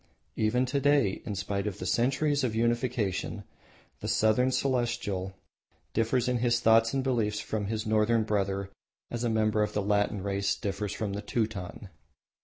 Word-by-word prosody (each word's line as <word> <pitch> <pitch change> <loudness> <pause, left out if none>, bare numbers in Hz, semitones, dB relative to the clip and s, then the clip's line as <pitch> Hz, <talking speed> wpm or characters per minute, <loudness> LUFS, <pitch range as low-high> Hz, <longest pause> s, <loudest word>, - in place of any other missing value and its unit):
Even 115 +4 +2
to 130 +2 0
day, 140 -8 +2
in 105 - -3
spite 100 +1 -2
of 100 - -3
centuries 140 +4 +1
of 115 -4 0
unification, 115 -4 -1 0.6
the 105 - -5
Southern 110 +4 +3
Celestial 120 -8 -1 0.6
differs 115 +2 +1
in 125 -1 +1
his 120 0 +2
thoughts 115 -1 +4
and 135 -1 0
beliefs 110 -5 0
from 105 -2 -3
his 110 +1 -2
Northern 110 +1 +2
brother 100 -2 -1 0.4
as 120 0 -3
a 120 - +1
member 110 -1 +2
of 105 - 0
the 105 - 0
Latin 105 -1 +1
race 100 0 0
differs 100 0 -3
from 105 -3 -3
the 100 - -3
Teuton. 105 -6 -3
110 Hz, 160 wpm, -29 LUFS, 105-120 Hz, 0.6 s, thoughts